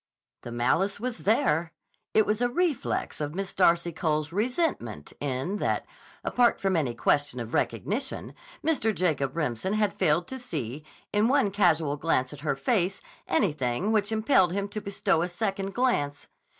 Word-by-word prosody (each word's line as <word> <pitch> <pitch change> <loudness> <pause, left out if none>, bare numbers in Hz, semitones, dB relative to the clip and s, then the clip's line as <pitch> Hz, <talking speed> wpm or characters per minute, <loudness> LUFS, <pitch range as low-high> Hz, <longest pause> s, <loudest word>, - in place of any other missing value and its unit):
The 120 - -8
malice 130 +13 +1
was 245 +1 -3
there. 175 - +2 0.4
It 215 - +5
was 210 +2 0
a 245 - +3
reflex 290 - -1
of 150 +2 -3
Miss 195 0 -3
Darcy 170 -2 +3
Cole's 155 -2 -1
resentment 210 - -1
in 140 +8 -2
that, - - -1 0.4
apart 245 -1 +3
from 195 -3 +1
any 135 -8 0
question 135 +2 +1
of 115 -1 -6
recognition, - - -1 0.3
Mr. 250 -9 +1
Jacob 155 -6 0
Remsen 150 - -1
had 210 -2 +1
failed 170 -1 +2
to 265 - -6
see, 150 - -5 0.3
in 210 +2 +3
one 260 -6 +3
casual 165 -7 +2
glance 140 -4 0
at 145 - -10
her 145 -2 -1
face, 185 - +1 0.3
anything 150 - +1
which 215 -1 +1
impelled 220 -5 +3
him 200 +1 -1
to 215 +1 -5
bestow 195 -3 0
a 175 - -1
second 195 +1 -3
glance. 145 - 0
185 Hz, 160 wpm, -27 LUFS, 145-215 Hz, 0.4 s, It